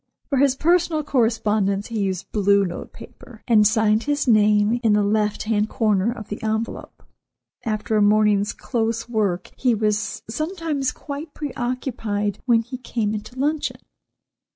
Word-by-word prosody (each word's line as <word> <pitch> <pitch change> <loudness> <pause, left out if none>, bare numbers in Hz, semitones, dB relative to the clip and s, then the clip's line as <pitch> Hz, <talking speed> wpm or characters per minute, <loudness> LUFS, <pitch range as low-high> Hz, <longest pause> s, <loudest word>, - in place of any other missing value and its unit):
For 275 -3 +1
his 275 -1 +4
personal 335 0 +2
correspondence 215 -6 +1
he 225 -2 -3
used 190 -3 -2
blue 200 -1 +3
note 175 -1 -6
paper, 230 -4 -14
and 215 -4 +5
signed 215 0 +2
his 290 -1 0
name 210 0 +4
in 225 -3 +3
the 210 0 +3
left 210 0 0
hand 215 -1 0
corner 215 -3 +1
of 225 -4 -8
the 210 - -5
envelope. 220 +1 -4 0.6
After 215 0 -1
a - - +3
morning's 205 -1 +3
close 230 -2 -2
work 205 -6 -1
he 250 -3 +2
was 215 0 -1
sometimes 310 - -2
quite 290 +1 -8
pre 295 -3 -5
occupied 225 -5 -2
when 230 -2 +4
he 245 +2 -8
came 225 -4 -2
into 215 +4 -7
luncheon. 295 +3 -1
220 Hz, 155 wpm, -22 LUFS, 210-255 Hz, 0.6 s, and